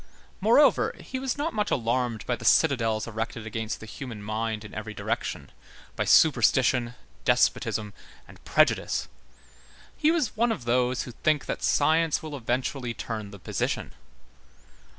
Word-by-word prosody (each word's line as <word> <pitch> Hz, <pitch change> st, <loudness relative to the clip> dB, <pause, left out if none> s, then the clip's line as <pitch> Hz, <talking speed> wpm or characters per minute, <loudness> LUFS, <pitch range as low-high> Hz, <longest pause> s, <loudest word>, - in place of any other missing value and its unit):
Moreover, 235 Hz, +9 st, +4 dB
he 260 Hz, -, -6 dB
was 265 Hz, 0 st, -2 dB
not 310 Hz, +3 st, -2 dB
much 210 Hz, -1 st, 0 dB
alarmed 120 Hz, -2 st, -1 dB
by 125 Hz, -, 0 dB
the 120 Hz, -, -11 dB
citadels 115 Hz, -5 st, +3 dB
erected 115 Hz, 0 st, -5 dB
against 110 Hz, 0 st, -4 dB
the -, -, -9 dB
human 115 Hz, -2 st, -8 dB
mind 110 Hz, 0 st, -3 dB
in -, -, -11 dB
every 105 Hz, 0 st, -6 dB
direction, -, -, -3 dB, 0.4 s
by -, -, -1 dB
superstition, 125 Hz, -3 st, +4 dB, 0.3 s
despotism, 105 Hz, -1 st, +1 dB, 0.3 s
and -, -, -16 dB
prejudice. -, -, +2 dB, 0.9 s
He 305 Hz, -, +2 dB
was 320 Hz, -8 st, +1 dB
one 235 Hz, +2 st, +2 dB
of 135 Hz, -, -4 dB
those 125 Hz, +1 st, +1 dB
who 125 Hz, -, -8 dB
think 150 Hz, +4 st, 0 dB
that -, -, -4 dB
science 160 Hz, +2 st, +2 dB
will 155 Hz, -2 st, -6 dB
eventually 125 Hz, -1 st, -2 dB
turn 110 Hz, -3 st, -5 dB
the 100 Hz, -, -11 dB
position. 90 Hz, -, -3 dB
125 Hz, 145 wpm, -26 LUFS, 110-155 Hz, 0.9 s, Moreover